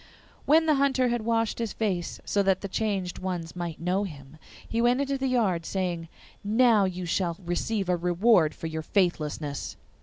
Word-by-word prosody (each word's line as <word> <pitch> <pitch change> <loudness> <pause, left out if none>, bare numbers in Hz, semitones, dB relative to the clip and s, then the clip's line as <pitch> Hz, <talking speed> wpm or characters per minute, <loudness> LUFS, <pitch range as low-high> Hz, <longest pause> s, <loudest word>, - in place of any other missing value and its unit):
When 320 +3 +5
the 310 - +4
Hunter 265 -2 +2
had 240 -1 0
washed 230 -1 0
his 230 -3 -2
face, 185 -6 -2
so 205 - +1
that 190 -1 +2
the 200 - -4
changed 195 -3 -2
ones 180 -3 -4
might 170 -3 -5
know 180 +4 0
him, 145 -4 -9 0.3
he 230 - -1
went 245 +2 +3
into 280 0 0
the 270 0 -1
yard, 210 -10 +1
saying, 175 -2 -2 0.4
'Now 220 0 +4
you 185 -1 -3
shall 170 -1 -1
receive 195 +3 -1
a 180 - +2
reward 175 0 +3
for - - -8
your 160 0 -3
faithlessness. 155 -5 -1
190 Hz, 180 wpm, -27 LUFS, 170-230 Hz, 0.4 s, When